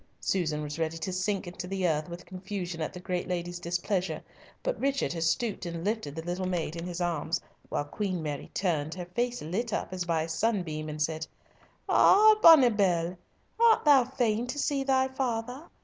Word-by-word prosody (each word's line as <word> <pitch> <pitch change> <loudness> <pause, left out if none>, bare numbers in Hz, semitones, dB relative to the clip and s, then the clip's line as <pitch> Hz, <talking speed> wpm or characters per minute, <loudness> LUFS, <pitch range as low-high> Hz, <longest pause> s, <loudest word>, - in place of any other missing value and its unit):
Susan 155 -5 -1
was 150 +2 -5
ready 160 0 -1
to 170 +3 -4
sink 195 +2 -1
into 180 +1 -7
the 190 -1 0
earth 155 0 0
with 175 +1 -8
confusion 185 -2 -5
at 155 - -2
the 180 - -9
great 180 -1 -3
lady's 175 -1 -3
displeasure, 175 +2 -2 0.4
but - - -1
Richard 275 -6 0
had 165 - -4
stooped 205 +7 0
and 170 -1 -5
lifted 205 -9 -2
the 160 - -5
little 180 +2 -2
maid 170 -3 -2
in 170 +1 -5
his 175 -1 -5
arms, 170 -2 -1 0.3
while - - -1
Queen 185 +1 -3
Mary 145 -2 -4
turned, 160 -4 0
her 180 -1 -5
face 240 +6 -2
lit 210 +9 -2
up 185 - -3
as 180 -1 -2
by 165 -2 0
a - - -5
sunbeam, 160 -4 -1
and 150 0 -1
said, 160 0 -3 0.6
"Ah, 430 +2 +7
bonnibell, 205 - +6 0.4
art 460 -5 +5
thou 285 -3 +7
fain 240 -2 0
to 270 - -4
see 280 -1 0
thy 265 -1 +3
father? 255 +1 -3
180 Hz, 190 wpm, -29 LUFS, 165-230 Hz, 0.6 s, Ah